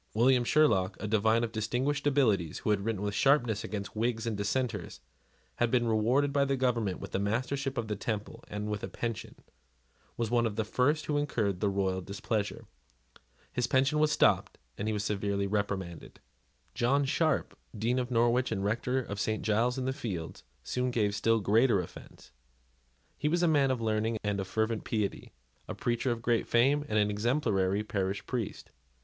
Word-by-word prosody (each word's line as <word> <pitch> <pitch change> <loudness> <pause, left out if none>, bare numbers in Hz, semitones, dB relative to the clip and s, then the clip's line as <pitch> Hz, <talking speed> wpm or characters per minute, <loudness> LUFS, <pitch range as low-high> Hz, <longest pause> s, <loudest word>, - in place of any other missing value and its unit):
William 125 +2 +4
Sherlock, 105 -10 +3
a 105 - -4
divine 110 +2 +2
of 115 - -2
distinguished 125 +7 -1
abilities, 110 - +2
who 110 - -1
had 100 -1 +1
written 105 -2 -2
with 105 -1 -1
sharpness 120 -3 +2
against 100 -1 -5
Whigs 115 0 -1
and 115 -2 -1
Dissenters, 105 -1 -2
and - - -33 0.5
had 120 - +2
been 120 -1 +2
rewarded 120 +6 +2
by 140 -1 +3
the 140 0 +1
government 115 -7 0
with - - -8
the - - -1
Mastership 130 +6 -1
of 115 -2 -2
the 105 - -2
Temple 105 0 -4
and 105 0 -4
with 105 -1 -3
a - - -2
pension, 115 -3 -5 0.8
was 115 -1 -1
one 120 -1 +3
of 105 - -5
the 110 0 -1
first 145 +7 +1
who 145 -1 0
incurred 110 -10 -1
the 100 - +1
royal 95 -1 0
displeasure. 100 +3 -3 0.9
His 125 -1 0
pension 135 +4 +2
was 155 0 +3
stopped, - - +2 0.2
and 105 - -4
he - - +1
was 105 -1 -1
severely 100 -1 -1
reprimanded. 100 -4 -3 0.5
John 140 +4 +2
Sharp, 155 +1 0 0.2
Dean 120 +4 +1
of 125 -1 -2
Norwich 120 +1 +2
and 100 -3 -1
Rector 125 +5 0
of 100 -3 -6
St. 110 +2 -1
Giles's 115 +4 +1
in 130 - -2
the 130 - 0
Fields, 90 -11 -5 0.2
soon 125 0 -1
gave 105 -4 +1
still 115 +2 +2
greater 110 +2 +3
offence. 90 - -10 0.9
He - - 0
was 175 +2 +1
a - - +4
man 145 -4 +3
of 130 -2 0
learning 110 0 0
and 100 -1 -1
fervent 110 +2 -1
piety, 105 -3 -2 0.4
a - - -5
preacher 120 +2 -1
of 115 -1 -2
great 115 -1 +1
fame, 135 +5 +3
and 110 - +1
an 105 0 +3
exemplary 105 -4 +1
parish 100 -2 -2
priest. 120 -5 -4
115 Hz, 185 wpm, -30 LUFS, 105-125 Hz, 0.9 s, William